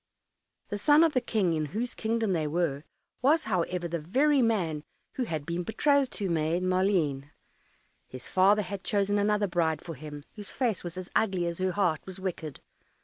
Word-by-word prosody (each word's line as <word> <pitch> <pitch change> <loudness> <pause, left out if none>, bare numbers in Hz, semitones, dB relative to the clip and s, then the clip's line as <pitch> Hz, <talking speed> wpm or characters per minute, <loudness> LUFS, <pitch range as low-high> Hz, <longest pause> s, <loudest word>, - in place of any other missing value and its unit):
The 205 - -3
son 295 +7 +6
of 325 -2 +3
the 255 - +2
King 195 -9 +1
in 155 -1 0
whose 245 +2 -2
kingdom 225 -2 0
they 160 -3 0
were, 155 -2 -1 0.4
was, 305 +5 +4
however, 180 -3 -1
the 170 0 -3
very 270 - +2
man 175 -10 0 0.3
who 255 - -2
had 155 -8 -4
been 170 +2 -2
betrothed 275 - +2
to 200 - -3
Maid 165 +1 0
Maleen. 185 -7 +1 0.8
His 130 - -10
father 200 +3 +4
had 200 0 -6
chosen 205 0 +1
another 210 0 +2
bride 170 -4 0
for 170 - -6
him, 145 0 -9
whose 205 -2 -6
face 240 -7 -1
was 175 0 -6
as 185 0 -7
ugly 190 -5 +2
as 170 0 -3
her 185 -1 0
heart 175 -6 +1
was 190 0 -6
wicked. 165 -6 -5
185 Hz, 185 wpm, -28 LUFS, 165-215 Hz, 0.8 s, son